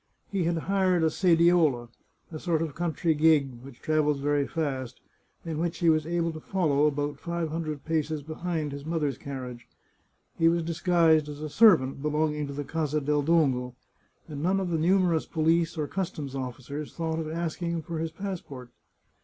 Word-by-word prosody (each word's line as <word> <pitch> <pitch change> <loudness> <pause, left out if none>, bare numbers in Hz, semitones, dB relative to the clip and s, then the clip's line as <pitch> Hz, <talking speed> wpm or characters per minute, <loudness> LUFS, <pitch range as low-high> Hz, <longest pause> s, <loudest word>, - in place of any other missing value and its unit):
He 190 -4 0
had 170 0 +1
hired 185 0 +1
a 160 - +3
sediola 165 -8 +3 0.2
— - - -41
a 155 - -6
sort 165 -2 0
of 155 -3 -4
country 165 -1 0
g^g 145 -6 +3
which 130 -2 -13
travels 150 -2 +1
very 145 0 +1
fast 130 -6 -3 0.2
— - - -39
in 160 -2 -3
which 170 0 -1
he 170 - +3
was 155 -1 0
able 170 0 0
to 155 - -7
follow 150 -5 +1
about 145 0 -2
five 170 -1 -3
hundred 155 -3 -4
paces 155 -2 -1
behind 155 0 -3
his 140 0 -7
mother's 150 -4 -2
carriage. 125 -3 -7 0.7
He 165 0 +5
was 170 0 +1
disguised 165 -2 +3
as 145 0 -7
a 155 - -4
servant 155 - +5
be 150 - 0
longing 150 -1 0
to 140 - -6
the 145 +1 -4
Casa 155 0 -1
del 150 +1 +1
Dongo, 135 -6 +1 0.5
and 145 -3 -6
none 185 +4 +2
of 185 -2 -2
the 165 - +1
numerous 175 -1 +2
police 165 +1 +1
or 155 - 0
customs 165 -7 -4
officers 135 +3 -6
thought 165 -1 -2
of 155 -1 -4
asking 170 +1 -3
him 170 -1 -2
for 165 -1 -5
his 165 0 -2
passport. 160 -9 -7
155 Hz, 185 wpm, -27 LUFS, 145-170 Hz, 0.7 s, He